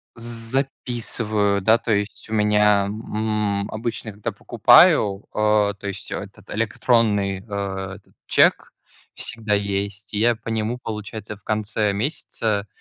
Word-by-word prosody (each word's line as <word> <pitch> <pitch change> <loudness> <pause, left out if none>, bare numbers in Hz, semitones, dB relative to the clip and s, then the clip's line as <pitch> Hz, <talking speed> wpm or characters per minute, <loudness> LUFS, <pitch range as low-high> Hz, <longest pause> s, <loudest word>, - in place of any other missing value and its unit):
Записываю, 115 -3 -1
да, 110 +4 +5
то 115 -1 -1
есть 105 +1 -3
у - - -5
меня, 105 -1 +4
м, 105 -1 -2
обычно, 110 0 -4
когда 105 0 -4
покупаю, 100 -1 +5
э, 105 -1 +2
то 100 - -6
есть 100 0 -6
этот - - -7
электронный, 110 -3 +1
э, - - -15 0.5
этот - - -19
чек - - +3 0.4
всегда 110 -2 -2
есть. 100 0 -2
Я 115 +3 +3
по 115 - -9
нему, 110 +2 -1
получается, 105 -1 -6
в 100 - -29
конце 105 -1 0
месяца 105 - -2
105 Hz, 125 wpm, -22 LUFS, 100-115 Hz, 0.5 s, да